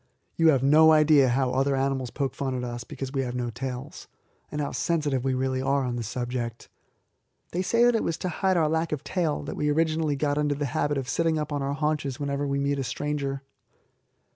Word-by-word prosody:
You 165 - +3
have 135 -5 +4
no 155 +3 +7
idea 150 -3 +5
how 130 +1 +1
other 135 +1 +1
animals 135 -2 -1
poke 135 +1 -2
fun 135 -2 -3
at 125 - -3
us 120 -1 -5
because 135 +2 -7
we 135 - 0
have 125 -1 -3
no 120 -1 -2
tails, 130 +2 -6 0.4
and 150 - -4
how 145 - -2
sensitive 145 -1 0
we 135 -1 0
really 130 0 -1
are 135 +1 +1
on 125 -1 -2
the 120 - -3
subject. 120 0 -4 0.8
They 180 - -1
say 230 +5 +2
that 245 0 +5
it 225 - +1
was 165 - -1
to 185 - -3
hide 185 +2 +1
our 160 -2 +3
lack 160 +1 0
of 150 -2 -3
tail 165 -6 -1
that 145 - -5
we 150 - 0
originally 155 -1 +1
got 145 +1 0
into 145 -1 +1
the 145 +1 -2
habit 145 +2 0
of 135 -2 -3
sitting 165 +3 +1
up 150 -1 -3
on 145 - -1
our 135 +1 -1
haunches 150 -3 -1
whenever 140 0 -2
we 140 0 0
meet 140 0 0
a - - -1
stranger. 140 +2 -3
140 Hz, 225 wpm, -26 LUFS, 130-150 Hz, 0.8 s, no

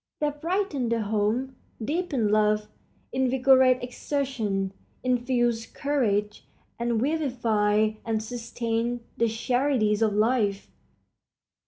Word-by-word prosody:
They 295 -1 +1
brighten 315 - -1
the 230 -1 +1
home, 220 +5 -1 0.2
deepen 280 - -1
love, 210 0 +2 0.5
invigorate 260 0 +4
exertion, 245 -7 -2 0.3
infuse 240 -2 +1
courage, 210 -8 -1 0.3
and 235 -1 0
vivify 225 -7 +1
and 220 -1 -1
sustain 235 0 -2 0.2
the 230 - +3
charities 230 -2 +1
of 215 -2 +3
life. 210 -2 +1
235 Hz, 95 wpm, -26 LUFS, 215-260 Hz, 0.5 s, invigorate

